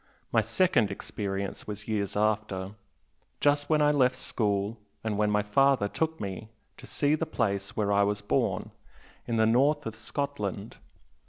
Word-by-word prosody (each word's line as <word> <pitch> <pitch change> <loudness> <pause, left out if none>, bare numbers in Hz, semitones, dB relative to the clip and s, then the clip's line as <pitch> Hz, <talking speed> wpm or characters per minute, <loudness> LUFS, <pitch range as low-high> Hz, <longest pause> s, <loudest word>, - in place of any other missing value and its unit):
My - - +4
second 170 - +2
experience 100 0 -4
was 105 0 -6
years 105 -3 -1
after, 105 -2 0 0.7
just 145 0 +2
when 155 -1 +4
I 150 - +5
left 130 -3 +3
school 105 -2 -1 0.2
and 110 -2 -1
when 105 0 +2
my 105 0 +2
father 130 +1 +3
took 160 +8 -2
me 100 +2 -5 0.3
to - - -12
see 145 0 +1
the 155 - 0
place 100 -4 -2
where 105 -2 +1
I 100 0 +4
was 100 0 0
born, 100 - 0 0.6
in 115 - 0
the 110 - +4
north 140 +6 +3
of 115 - -4
Scotland. 115 -2 -4
110 Hz, 160 wpm, -28 LUFS, 100-140 Hz, 0.7 s, I